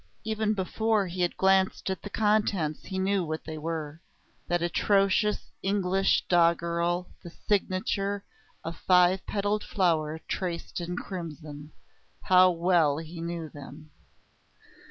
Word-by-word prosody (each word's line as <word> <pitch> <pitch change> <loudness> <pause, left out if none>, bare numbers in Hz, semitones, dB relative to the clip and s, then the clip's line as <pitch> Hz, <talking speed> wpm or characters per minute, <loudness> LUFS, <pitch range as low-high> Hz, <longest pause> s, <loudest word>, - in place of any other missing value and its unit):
Even 220 0 0
before 210 +2 0
he 180 0 -5
had 175 - 0
glanced 190 0 +2
at 190 - -4
the 205 - -7
contents 205 -8 0
he 190 - -5
knew 190 0 +1
what 155 -1 -4
they 155 -1 -6
were. 160 -1 -5 0.5
That 175 -1 0
atrocious 195 +4 +1
English 195 -1 +1
doggerel, 170 +1 +1
the 175 - -9
signature 195 +1 -1 0.4
a 165 - -4
five 180 +2 +3
petalled 205 +1 -1
flower 160 -4 0
traced 175 -1 -4
in 175 +1 -4
crimson! 155 -5 -7 0.5
How 185 0 +6
well 170 -4 +2
he 165 +1 -7
knew 170 -1 -4
them! 145 +2 -12
180 Hz, 125 wpm, -28 LUFS, 165-195 Hz, 0.5 s, How